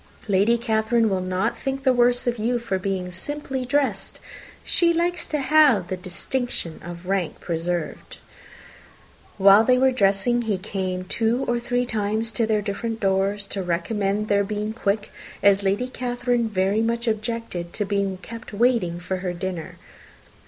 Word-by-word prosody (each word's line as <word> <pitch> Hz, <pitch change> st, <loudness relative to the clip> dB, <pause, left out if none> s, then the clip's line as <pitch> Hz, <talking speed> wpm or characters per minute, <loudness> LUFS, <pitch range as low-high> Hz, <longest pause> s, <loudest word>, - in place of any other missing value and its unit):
Lady 205 Hz, +4 st, +3 dB
Catherine 225 Hz, 0 st, +1 dB
will 190 Hz, -1 st, 0 dB
not 185 Hz, +5 st, -1 dB
think 270 Hz, 0 st, -3 dB
the 260 Hz, -1 st, +4 dB
worse 245 Hz, 0 st, +3 dB
of 240 Hz, -2 st, -1 dB
you 240 Hz, +3 st, +1 dB
for 230 Hz, -5 st, -2 dB
being 185 Hz, -1 st, -3 dB
simply 265 Hz, +6 st, -4 dB
dressed. 280 Hz, +2 st, -1 dB, 0.4 s
She 340 Hz, -2 st, +3 dB
likes 345 Hz, +1 st, 0 dB
to 305 Hz, -, -1 dB
have 275 Hz, -, +4 dB
the 185 Hz, -, -1 dB
distinction 185 Hz, -, -4 dB
of 175 Hz, +1 st, -8 dB
rank 190 Hz, -3 st, -1 dB
preserved." 170 Hz, 0 st, -3 dB, 1.2 s
While 200 Hz, +2 st, +7 dB
they 250 Hz, +2 st, +4 dB
were 265 Hz, +1 st, +4 dB
dressing, 215 Hz, +1 st, +2 dB
he 220 Hz, -4 st, -1 dB
came 185 Hz, -1 st, -3 dB
two 230 Hz, +6 st, 0 dB
or 240 Hz, 0 st, +1 dB
three 245 Hz, +1 st, 0 dB
times 220 Hz, 0 st, -1 dB
to 225 Hz, 0 st, 0 dB
their 215 Hz, -2 st, +1 dB
different 225 Hz, +3 st, -3 dB
doors, 195 Hz, +1 st, +1 dB
to 195 Hz, -, -3 dB
recommend 195 Hz, +4 st, -1 dB
their 200 Hz, -1 st, +3 dB
being 210 Hz, +1 st, -3 dB
quick, 205 Hz, -1 st, -1 dB, 0.3 s
as 200 Hz, 0 st, +5 dB
Lady 200 Hz, +5 st, +1 dB
Catherine 245 Hz, -2 st, -1 dB
very 195 Hz, +1 st, +1 dB
much 235 Hz, +1 st, -1 dB
objected 215 Hz, -5 st, -3 dB
to 210 Hz, -, -1 dB
be 200 Hz, -1 st, -1 dB
kept 230 Hz, -1 st, -9 dB
waiting 215 Hz, -6 st, +2 dB
for 185 Hz, +2 st, -3 dB
her 180 Hz, -1 st, -3 dB
dinner. 175 Hz, -2 st, -5 dB
215 Hz, 160 wpm, -24 LUFS, 190-240 Hz, 1.2 s, While